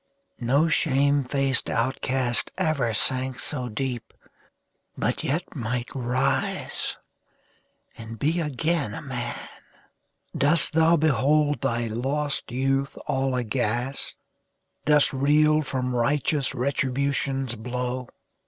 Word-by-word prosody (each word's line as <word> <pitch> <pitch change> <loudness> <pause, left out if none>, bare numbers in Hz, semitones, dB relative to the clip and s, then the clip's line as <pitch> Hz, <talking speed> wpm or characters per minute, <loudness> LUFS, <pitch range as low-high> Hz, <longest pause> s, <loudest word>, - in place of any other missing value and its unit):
No 135 +7 +3
shame 140 -2 +3
faced 135 0 0
outcast 130 0 0
ever 155 -10 +1
sank 130 +3 0
so 125 -3 -4
deep, 120 +1 -4 0.8
But - - -1
yet 165 +6 -2
might 120 -1 -2
rise 130 +1 -1 1.0
and 115 0 -8
be 155 +8 +1
again 150 -5 -1
a - - -7
man! 125 -4 -4 1.0
Dost 155 +4 +4
thou 165 +1 +5
behold 150 0 +2
thy 120 -3 0
lost 135 +6 -2
youth 135 +2 0
all 135 -1 0
aghast? 120 +2 -1 0.7
Dost 150 -2 +5
reel 150 +3 +4
from 130 -3 -2
righteous 140 +3 +1
Retribution's 135 0 0
blow? 125 +2 -3
135 Hz, 100 wpm, -25 LUFS, 125-145 Hz, 1.0 s, thou